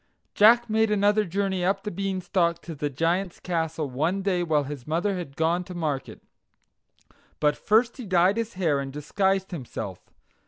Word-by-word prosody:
Jack 235 +3 +6
made 220 0 +2
another 210 +1 +3
journey 190 0 -1
up 195 +2 0
the 210 - -4
Beanstalk 185 -2 0
to 170 - -7
the 145 -1 -3
Giant's 170 +6 -1
castle 160 -3 -2
one 160 +9 -1
day 185 -3 +1
while 155 -4 +1
his 140 -2 -8
mother 175 +6 0
had 170 -7 -6
gone 165 +3 +1
to 180 - -9
market; 150 -5 -3 1.2
but 150 -1 +2
first 230 +4 +2
he 245 -5 -7
dyed 185 +3 +3
his 230 -2 -3
hair 165 -7 +1
and 135 -1 -4
disguised 190 +7 0
himself. 110 - -6
180 Hz, 165 wpm, -26 LUFS, 155-195 Hz, 1.2 s, Jack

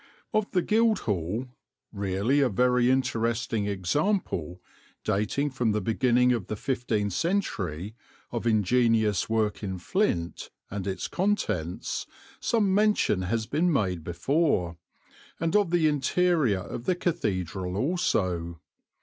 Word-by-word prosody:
Of 215 -1 +1
the 180 -2 +1
Guildhall, 120 - +1 0.5
really 100 +6 0
a 135 -3 +3
very 125 +3 +3
interesting 115 -3 0
example, 95 - -1 0.4
dating 125 +9 0
from 120 -4 0
the 105 - +1
beginning 125 +4 +2
of 115 -6 -3
the 110 - -3
fifteenth 110 -4 -1
century, 105 - -1 0.4
of 120 0 -2
ingenious 110 -2 +2
work 110 -2 0
in 95 -3 -3
flint, 90 - -1 0.2
and 100 -1 -4
its 95 - -3
contents, 135 - -1 0.3
some 210 -5 +1
mention 210 - +3
has 110 +5 -1
been 165 +8 +1
made 95 - 0
before, 90 - 0 0.6
and 165 +2 0
of 205 -4 +4
the 170 -2 +3
interior 150 - +2
of 115 +5 -7
the 185 - +2
cathedral 95 - -2
also. 95 - 0
115 Hz, 120 wpm, -27 LUFS, 95-155 Hz, 0.6 s, of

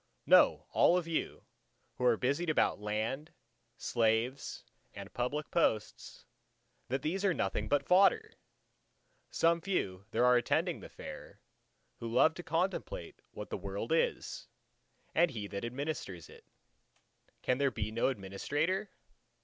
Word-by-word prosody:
Know - - +5
all 175 - +5
of 175 -2 -2
you, 165 - -3 0.5
who 125 - -3
are 120 -2 +5
busied 140 +8 0
about 155 - +2
land, 110 +8 -2 0.5
slaves 115 +3 0 0.3
and 100 0 -9
public 140 +5 -2
posts, 105 - -1 0.6
that 135 +2 -2
these 185 +6 -1
are 190 -4 +3
nothing 100 +2 -1
but 145 +1 +1
fodder! 200 - +4 1.0
Some 165 0 +2
few 100 - -2
there 115 +2 +2
are 125 0 +6
attending 120 - 0
the - - -10
Fair, - - -10 0.6
who 115 -1 -5
love 155 +7 +5
to 175 - -8
contemplate 190 - -2
what - - -9
the - - -3
world - - -5
is, 485 0 0 0.7
what 175 - +4
He 110 -6 -5
that 100 +1 -5
administers 120 - -4
it. - - -15 1.0
Can 125 +1 +1
there 140 -1 +3
be 110 -3 -4
no 115 +1 +1
Administrator? 145 - -1
135 Hz, 135 wpm, -32 LUFS, 110-170 Hz, 1.0 s, are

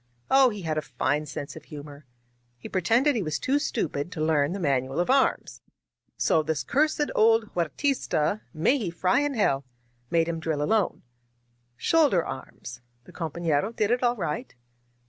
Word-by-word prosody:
Oh! 270 -1 +6
he 210 -4 -7
had 155 -1 -1
a - - -3
fine 150 0 -1
sense 145 0 -6
of 160 - -11
humor. 145 -1 -10 0.5
He 120 - -9
pretended 235 - +2
he 225 - 0
was 155 -5 -2
too 275 - +1
stupid 170 - -2
to 165 - -7
learn 155 -1 +2
the 200 - -4
manual 135 -3 0
of 175 +8 +2
arms. 270 0 +1 0.6
So 160 - +3
this 155 0 -2
cursed 300 +1 +1
old 225 0 +3
Huertista 200 - 0
— - - -39
(may 275 +2 +4
he 205 -7 -2
fry 180 +6 +1
in 290 -1 -1
hell!) 140 -11 +1 0.2
— 120 0 -40
^made 165 -1 +3
him 165 0 -3
drill 160 -2 -1
alone. 210 +4 0 0.4
" 120 0 -43
^Shoulder 285 - +3
arms 125 -2 -8
!' 120 0 -41
The - - -15
compa^iero 165 +4 -1
did 215 +1 +1
it 245 - +2
all 245 -1 +2
right. 200 - -4
170 Hz, 185 wpm, -26 LUFS, 145-230 Hz, 0.6 s, Oh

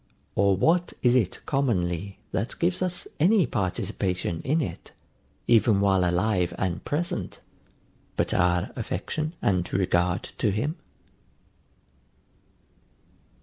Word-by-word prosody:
Or 100 -1 +3
what 170 - +2
is 120 -1 +5
it 120 -8 +1
commonly, 100 - -1
that 110 +6 -2
gives 175 +2 0
us 180 -1 -1
any 185 +3 +5
participation 95 -5 -2
in 150 +6 +1
it, 145 - -5 0.5
even 115 -3 +4
while 95 -2 +3
alive 90 +1 +1
and 85 -3 -2
present, 170 +4 -3 0.8
but - - +1
our 90 +1 +2
affection 150 - -3
and 90 -3 +1
regard 90 -1 +1 0.2
to 110 - +2
him? 125 - -1
100 Hz, 105 wpm, -26 LUFS, 90-140 Hz, 0.8 s, is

